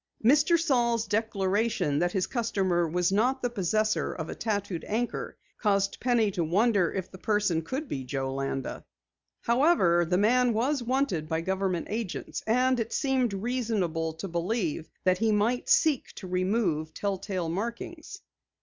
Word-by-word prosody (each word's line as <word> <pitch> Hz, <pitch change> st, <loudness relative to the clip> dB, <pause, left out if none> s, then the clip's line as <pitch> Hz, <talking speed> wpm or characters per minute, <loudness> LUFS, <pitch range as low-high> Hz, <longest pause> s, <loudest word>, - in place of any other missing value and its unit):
'" -, -, -13 dB
Mr. 300 Hz, +6 st, +5 dB
Saal's 240 Hz, -7 st, +1 dB
declaration 205 Hz, -5 st, 0 dB
that 175 Hz, +1 st, +1 dB
his 190 Hz, -2 st, +1 dB
customer 190 Hz, -8 st, 0 dB
was 175 Hz, +3 st, +1 dB
not 250 Hz, +6 st, +1 dB
the 245 Hz, -, 0 dB
possessor 215 Hz, +1 st, 0 dB
of 160 Hz, -2 st, -6 dB
a -, -, -3 dB
tattooed 205 Hz, -5 st, -3 dB
anchor 235 Hz, +3 st, -3 dB, 0.2 s
caused 200 Hz, -2 st, +1 dB
Penny 235 Hz, -4 st, +2 dB
to 175 Hz, -3 st, -1 dB
wonder 195 Hz, +2 st, +2 dB
if 190 Hz, -2 st, -4 dB
the 185 Hz, -, -11 dB
person 205 Hz, -6 st, +1 dB
could 265 Hz, -, -4 dB
be 135 Hz, -, -4 dB
Joe 135 Hz, 0 st, -3 dB
Landa. 135 Hz, -1 st, -3 dB, 0.6 s
However, 235 Hz, -, +3 dB
the 180 Hz, +2 st, +1 dB
man 240 Hz, +4 st, +3 dB
was 255 Hz, +5 st, 0 dB
wanted 240 Hz, -, -1 dB
by 160 Hz, 0 st, 0 dB
government 190 Hz, -1 st, -1 dB
agents 220 Hz, -3 st, -4 dB
and 250 Hz, +2 st, +3 dB
it 230 Hz, 0 st, -3 dB
seemed 265 Hz, -4 st, +1 dB
reasonable 195 Hz, -8 st, -1 dB
to 165 Hz, +5 st, -6 dB
believe 170 Hz, -2 st, -2 dB
that 185 Hz, -1 st, +2 dB
he 225 Hz, 0 st, +2 dB
might 220 Hz, +4 st, +1 dB
seek 300 Hz, -5 st, +3 dB
to -, -, -9 dB
remove 180 Hz, -4 st, 0 dB
tell 200 Hz, -2 st, -2 dB
tale 185 Hz, -5 st, -3 dB
markings. 235 Hz, -, -5 dB
205 Hz, 160 wpm, -28 LUFS, 175-235 Hz, 0.6 s, Mr